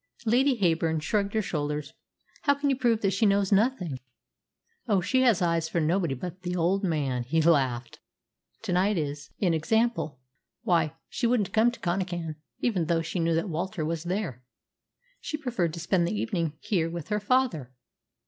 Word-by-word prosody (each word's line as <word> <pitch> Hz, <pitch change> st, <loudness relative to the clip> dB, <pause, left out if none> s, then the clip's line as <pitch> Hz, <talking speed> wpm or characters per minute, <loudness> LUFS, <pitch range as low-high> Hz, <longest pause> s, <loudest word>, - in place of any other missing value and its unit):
Lady 255 Hz, +4 st, +3 dB
Heyburn 165 Hz, -3 st, +2 dB
shrugged 200 Hz, +6 st, -1 dB
her 220 Hz, -, +2 dB
shoulders. 150 Hz, -4 st, -3 dB, 0.5 s
"How 285 Hz, -1 st, +3 dB
can 285 Hz, 0 st, 0 dB
you -, -, +2 dB
prove 240 Hz, -3 st, +1 dB
that 195 Hz, -, +2 dB
she 210 Hz, +3 st, +3 dB
knows 200 Hz, 0 st, +2 dB
nothing?" 195 Hz, -, +1 dB, 0.9 s
"Oh, 205 Hz, -4 st, +3 dB
she 255 Hz, +9 st, +1 dB
has 235 Hz, -8 st, +4 dB
eyes 165 Hz, -1 st, +1 dB
for 170 Hz, -, 0 dB
nobody 165 Hz, -2 st, +1 dB
but 180 Hz, +7 st, -7 dB
the 180 Hz, 0 st, -3 dB
old 180 Hz, +4 st, +1 dB
man," 145 Hz, -8 st, 0 dB
he 135 Hz, +7 st, 0 dB
laughed. 130 Hz, -7 st, +1 dB, 0.6 s
"To -, -, -2 dB
night 190 Hz, +3 st, +2 dB
is 145 Hz, -2 st, -3 dB
an 180 Hz, -4 st, +3 dB
example. 190 Hz, -, 0 dB, 0.4 s
Why, 165 Hz, -4 st, +2 dB
she 240 Hz, -, -1 dB
wouldn't 230 Hz, -5 st, +1 dB
come 225 Hz, +2 st, +5 dB
to 240 Hz, -, -9 dB
Connachan, 175 Hz, -3 st, -2 dB, 0.2 s
even 195 Hz, -9 st, +1 dB
though 165 Hz, 0 st, +1 dB
she 175 Hz, -, -3 dB
knew 165 Hz, 0 st, +2 dB
that 165 Hz, +5 st, 0 dB
Walter 170 Hz, 0 st, -2 dB
was 165 Hz, +1 st, -3 dB
there. 175 Hz, -, -3 dB, 0.8 s
She 305 Hz, -, -4 dB
preferred 240 Hz, -, -1 dB
to -, -, -6 dB
spend 170 Hz, +1 st, +1 dB
the 210 Hz, +4 st, -2 dB
evening 170 Hz, -9 st, -1 dB
here 165 Hz, -6 st, 0 dB
with 170 Hz, 0 st, -6 dB
her 210 Hz, 0 st, +1 dB
father." 205 Hz, -, +1 dB
175 Hz, 175 wpm, -27 LUFS, 160-210 Hz, 0.9 s, come